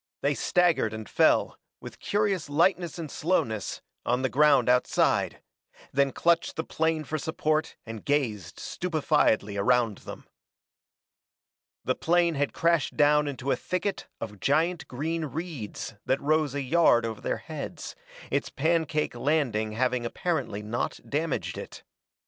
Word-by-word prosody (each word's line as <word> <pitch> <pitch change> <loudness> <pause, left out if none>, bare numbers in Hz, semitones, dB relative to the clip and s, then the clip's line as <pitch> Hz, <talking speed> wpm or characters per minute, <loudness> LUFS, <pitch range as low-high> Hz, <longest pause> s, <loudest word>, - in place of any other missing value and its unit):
They 145 - +2
staggered 170 -8 +2
and 110 -2 -7
fell, - - +3 0.2
with - - -10
curious 200 -6 0
lightness 170 +3 +2
and 160 -4 -6
slowness, 115 - -1 0.2
on 125 +2 0
the 130 - +2
ground 145 -3 +5
outside, 125 0 +2 0.5
then 140 0 +3
clutched 170 +4 +1
the 160 - -2
plane 160 -1 0
for 155 +1 -3
support 155 0 -1
and 115 -2 -7
gazed 110 - -1
stupefiedly 150 - +1
around 115 0 +2
them. - - -10 1.6
The - - +2
plane 170 0 +2
had 145 -1 0
crashed 165 -4 +1
down 150 0 +4
into 135 -1 -3
a - - +3
thicket 190 +2 -3
of 105 -2 -7
giant 160 - +1
green 160 +5 -2
reeds 150 - -6
that 130 - +2
rose 155 -1 +1
a 140 - -1
yard 130 -5 +4
over 110 -2 -5
their - - -1
heads, - - -7 0.4
its - - 0
pancake 160 0 0
landing 120 -5 0
having 125 +1 0
apparently 125 - -2
not 110 +3 -3
damaged 155 +1 -2
it. - - -9
145 Hz, 135 wpm, -27 LUFS, 120-165 Hz, 1.6 s, ground